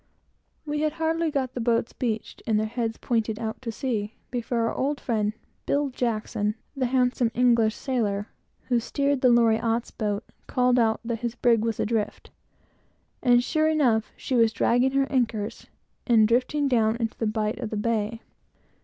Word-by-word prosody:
We 295 0 -2
had 305 0 0
hardly 325 0 0
got 265 -4 -2
the 245 - -3
boats 230 0 +1
beached, 225 -4 -3
and 215 -2 +2
their 215 - 0
heads 225 0 -3 0.4
out, 225 +2 -5 0.7
before 240 -1 -1
our - - -2
old 280 +2 -1
friend, 215 -3 -1 0.3
Bill 285 0 +1
Jackson, 215 -4 -1 0.2
the 260 -2 0
handsome 250 -1 +2
English 235 -3 +3
sailor, 210 -6 -1 0.4
who 245 -2 +1
steered 280 +3 0
the 255 - +5
Loriotte's 230 0 +2
boat, 210 -1 -2 0.2
called 250 -1 +2
out 220 -1 +2
that 230 -1 -3
the 240 -1 -3
brig 235 -3 +5
was 225 -2 -1
adrift; 220 -1 -2 0.9
and, 245 -1 +4
sure 310 +3 +1
enough, 250 -8 +2
she - - -4
was 230 -3 +4
dragging 245 +4 +2
her 275 0 +3
anchors, 230 -5 -1 0.4
and 225 -3 +5
drifting 255 +5 +1
down 225 -4 +2
into 230 -1 -3
the 225 - 0
bight 215 +1 -1
of 235 -4 -4
the 215 - -3
bay. 225 +1 -1
235 Hz, 160 wpm, -26 LUFS, 220-255 Hz, 0.9 s, the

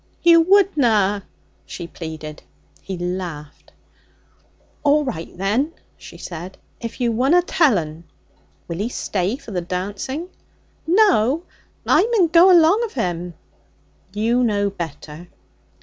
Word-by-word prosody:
'You 335 -1 +7
wouldna!' 245 - +3 0.4
she 175 - -8
pleaded. 160 -2 -8 0.4
He 190 - -6
laughed. 175 -4 -6 1.1
'A'right, 285 - 0
then,' 225 - 0 0.2
she - - -13
said, 175 +2 -8 0.2
'if 230 +2 -7
you 240 -2 +1
wunna 270 +10 +3
tell 305 - +3
'un.' 160 0 -6 0.6
'Will 170 +1 -5
he 215 +4 -1
stay 195 -3 -2
for 230 - -12
the 180 -3 -2
dancing?' 200 - -4 0.6
'No. 335 - +3 0.4
I - - +4
mun 370 -7 +3
go 345 +3 +6
along 350 +6 +5
of 450 -2 -5
him.' 175 -1 -3 0.8
'You 230 +5 +1
know 205 -3 +1
better.' 165 -1 -8
210 Hz, 120 wpm, -21 LUFS, -, 1.1 s, You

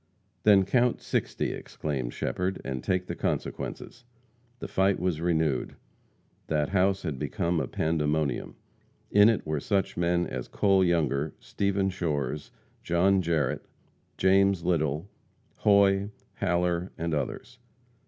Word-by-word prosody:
"Then 100 -3 +5
count 125 +4 +2
sixty," - - -2
exclaimed 65 -6 -4
Shepherd, 95 +7 -2
"and 65 -2 -4
take 90 -1 0
the - - -4
consequences." 125 - -4 0.5
The - - -6
fight 95 +1 +2
was 90 -3 -1
renewed. 80 -6 0 0.7
That 75 -2 0
house 95 0 +2
had 75 -6 -3
become 85 -1 -1
a - - -2
pandemonium. 80 -2 -1 0.6
In 105 +2 +7
it 115 - 0
were 75 -1 -1
such 95 +5 -1
men 85 0 +1
as 60 - -5
Cole 95 -2 +3
Younger, 80 -4 +1
Stephen 100 -1 -1
Shores, 75 -5 -2 0.3
John 95 +3 +3
Jarrette, 80 -6 -1 0.5
James 95 -1 +3
Little, 80 -1 0 0.5
Hoy, 100 -1 +4 0.3
Haller, 90 -1 0
and 85 0 -2
others. 120 +10 -4
90 Hz, 125 wpm, -28 LUFS, 80-95 Hz, 0.7 s, In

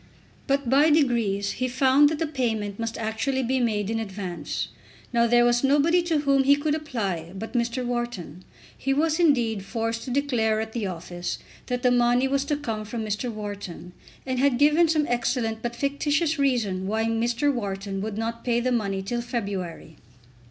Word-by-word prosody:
But 280 -2 +1
by 280 +5 +5
degrees 235 -10 +2
he 255 - -2
found 265 +3 +4
that 315 - -2
the 325 - 0
payment 225 -8 -2
must 230 0 -3
actually 225 +5 -1
be 260 +2 +1
made 215 -4 0
in 225 - -1
advance. 185 -7 -4 0.4
Now 235 0 +4
there 240 +1 +5
was 240 +1 +2
nobody 295 +6 +4
to 330 -3 0
whom 275 -2 +3
he 280 +1 +6
could 295 +1 -1
apply 200 - -3
but 220 +4 -6
Mr. 240 +1 -1
Wharton. 240 - -4 0.3
He 270 +1 -1
was, 315 +2 +1
indeed, 240 - +2
forced 225 +1 -2
to - - -6
declare 245 -5 +1
at 220 0 -4
the 225 -4 -2
office 175 0 -5 0.3
that 250 0 -2
the 250 - +4
money 245 +1 +3
was 275 +1 0
to 290 0 0
come 225 -7 -4
from 220 +1 -4
Mr. 215 +4 -2
Wharton, 205 -5 -7 0.3
and 260 -1 -1
had 270 -2 +3
given 300 +5 +5
some 310 -2 +2
excellent 235 -2 -1
but 240 0 -3
fictitious 290 +4 0
reason 215 -9 +1
why 220 +2 0
Mr. 235 +5 +1
Wharton 195 -4 -3
would 215 0 -4
not 230 +1 -3
pay 240 -1 +1
the 255 +1 0
money 200 -5 -1
till 240 +5 -2
February. 195 -9 -5
240 Hz, 180 wpm, -25 LUFS, 215-275 Hz, 0.4 s, he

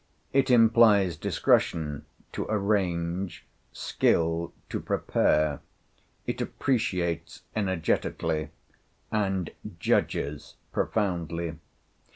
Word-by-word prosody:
It 135 0 +3
implies 115 -6 +5
discretion 75 -1 +1 0.3
to - - -4
arrange, 95 -4 -1 0.3
skill 85 +1 +1 0.2
to - - -2
prepare; 75 -2 +1 0.7
it - - -3
appreciates 85 -9 -1
energetically, 85 -5 0 0.6
and 95 -5 0 0.3
judges 75 +1 0 0.2
profoundly. 85 -5 -1
90 Hz, 70 wpm, -27 LUFS, 80-105 Hz, 0.7 s, implies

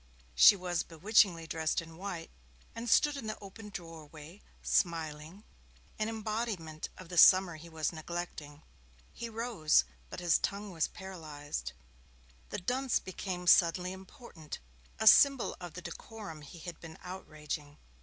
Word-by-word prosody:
She - - +9
was 180 -3 -1
bewitchingly 175 0 +3
dressed 160 -1 -1
in 165 -1 -9
white, 180 -2 -6 0.4
and 230 +1 -5
stood 295 +5 +4
in 230 - -6
the 215 - -3
open 210 +2 -10
doorway, 165 -1 -10 0.2
smiling 165 +2 -1 0.6
an 215 +1 0
embodiment 215 -8 -3
of 185 - -10
the 175 -2 +2
summer 185 -3 +7
he 170 +2 -12
was 160 0 -2
neglecting. 160 -2 -6 0.5
He 235 - -6
rose, 220 - +2 0.3
but - - -7
his 175 -2 +3
tongue 200 0 -3
was 165 -4 0
paralysed. 155 -6 -7 0.8
The - - -3
dunce 250 +7 0
became 185 -1 -5
suddenly 180 +1 +5
important 190 - -10 0.4
a 220 - -2
symbol 275 +3 +6
of 175 -3 -8
the 180 - -7
decorum 205 -9 -8
he 150 +4 -12
had 170 +1 -8
been 160 -1 -10
outraging. 155 -5 -6
175 Hz, 140 wpm, -32 LUFS, 160-205 Hz, 0.8 s, She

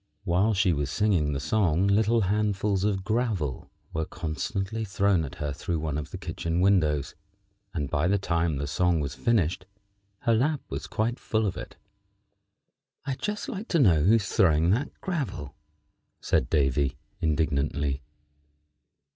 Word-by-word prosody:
While 100 +3 +2
she 95 -2 +3
was 70 -2 -1
singing 90 -5 +1
the 70 - -2
song 85 +3 +2
little 110 +3 +3
handfuls 100 -1 +1
of 100 -2 0
gravel 105 - -1 0.2
were 80 - -1
constantly 95 +7 -3
thrown 95 -3 +2
at 70 - -7
her 75 -1 -3
through 85 +4 -2
one 75 -2 -2
of 75 0 -4
the - - -6
kitchen 85 +1 -3
windows, 80 -7 +2 0.6
and 75 -4 -2
by 75 +4 0
the 100 +2 +3
time 85 -4 0
the 70 - -2
song 85 +3 +1
was 70 -3 -3
finished 90 -6 0 0.5
her 115 - +2
lap 140 +6 +1
was - - -5
quite 115 +3 -1
full 110 0 0
of 100 - -1
it. - - -8 1.3
"I'd 135 -2 -3
just 210 +4 -3
like 225 -4 -5
to 170 - +2
know 90 - +5
who 100 +9 +5
is 105 -4 0
throwing 85 -5 +3
that 125 +8 +1
gravel," 140 - -3 0.7
said 65 - +1
Davy, 70 -1 +1 0.2
indignantly. 75 -3 0
90 Hz, 155 wpm, -27 LUFS, 75-105 Hz, 1.3 s, know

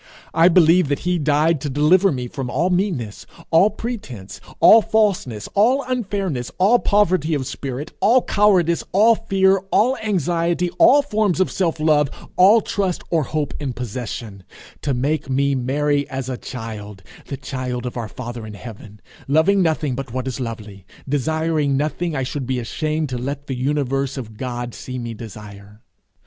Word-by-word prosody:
I 165 +1 +5
believe 175 -1 +5
that 145 0 -2
he 180 -1 +1
died 150 +1 +2
to 145 - -3
deliver 160 +8 +4
me 125 -3 -3
from 130 0 -5
all 165 +9 0
meanness, 175 - -2 0.2
all 170 +5 +5
pretence, 200 - -7 0.2
all 225 - +8
falseness, 195 - 0
all 250 +7 +3
unfairness, 195 - -2
all 210 +6 +4
poverty 185 -6 +2
of 135 -2 -2
spirit, 135 +2 -6
all 240 +4 +4
cowardice, 185 -5 +2
all 215 +4 +6
fear, 195 -3 +2
all 245 +6 +3
anxiety, 175 - 0
all 285 +2 +6
forms 215 - 0
of 185 - +1
self 165 -4 -1
love, 150 -2 +3 0.3
all 205 +5 +6
trust 195 -3 -2
or 165 -2 +2
hope 150 +1 -3
in 140 -4 -3
possession; 115 -4 -6 0.4
to 140 -3 -1
make 140 +3 -1
me 140 +1 +1
merry 145 +3 0
as 135 -2 -4
a 130 - -2
child, 105 -6 -8 0.2
the 140 - -5
child 125 -2 -5
of 125 - -5
our 115 -3 -4
father 120 -1 -7
in 105 - -9
heaven, 105 -2 -11 0.3
loving 160 +8 +3
nothing 155 -5 0
but 135 -1 -5
what 130 +1 -3
is 130 0 -4
lovely, 110 -5 -7 0.2
desiring 150 0 0
nothing 155 +3 -2
I 135 - -1
should 135 0 -4
be 130 -1 -1
ashamed 155 +5 -2
to 125 -1 -3
let 140 +3 -5
the 135 - -4
universe 135 0 -1
of 110 -4 -7
God 120 0 -5
see 130 0 -7
me 120 -2 -5
desire. 105 -2 -11
145 Hz, 165 wpm, -20 LUFS, 125-180 Hz, 0.4 s, all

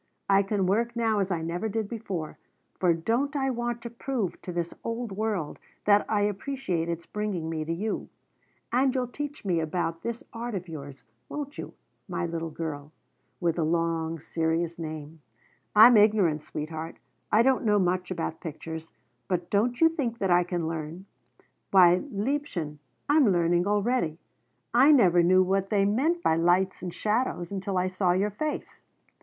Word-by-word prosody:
I 195 0 +5
can 200 -1 0
work 230 +5 +1
now 225 -2 +1
as 195 -1 0
I 165 -2 -1
never 175 +7 -2
did 220 0 -2
before, 200 -8 -5 0.4
for 180 -2 +4
don't 235 - 0
I 270 -1 +1
want 240 -1 -3
to 235 - -5
prove 235 -5 -3
to 180 - -6
this 170 -1 -3
old 230 -1 -3
world 200 -6 -2 0.3
that 205 0 +4
I 210 -2 +2
appreciate 205 -4 -2
its 170 0 -4
bringing 195 -6 -3
me 160 -1 -2
to 160 - -4
you? 205 +6 -3 0.6
And 260 +2 +2
you'll 255 -1 +1
teach 290 -1 -6
me 175 -4 +1
about 165 +1 -2
this 235 0 -4
art 235 -1 -4
of 180 -1 -4
yours, 140 -4 -9 0.3
won't 290 -1 -5
you, - - -7 0.3
my - - -2
little 165 -1 -3
girl 150 -2 -5 0.5
with 170 -2 0
the 165 - +1
long, 165 0 0
serious 165 +2 -1
name? 155 -1 -7 0.5
I'm 230 +3 +9
ignorant, 205 -8 +4
sweetheart, 155 +1 -6 0.3
I 220 +2 +5
don't 265 0 +3
know 210 -2 +3
much 180 -1 +1
about 165 -3 -3
pictures, 160 0 -7 0.4
but 180 -2 -2
don't 235 +5 +1
you 325 - +8
think 275 -8 -2
that 195 -4 0
I 175 0 +5
can 175 -2 -2
learn? 165 +3 -5 0.6
Why, 180 -2 +6
liebchen, 205 - -2 0.3
I'm 290 -5 +5
learning 175 +1 +2
already! 205 -5 +1 0.6
I 265 +5 +7
never 185 - +6
knew 185 +2 +5
what 195 +1 0
they 200 -2 +3
meant 295 +12 +1
by 160 - +3
lights 180 +3 +2
and 180 - -4
shadows 210 -4 -1
until 195 -1 -2
I 180 - +2
saw 185 -1 +1
your 200 +3 +1
face. 300 +9 -5
190 Hz, 170 wpm, -27 LUFS, 165-230 Hz, 0.6 s, I'm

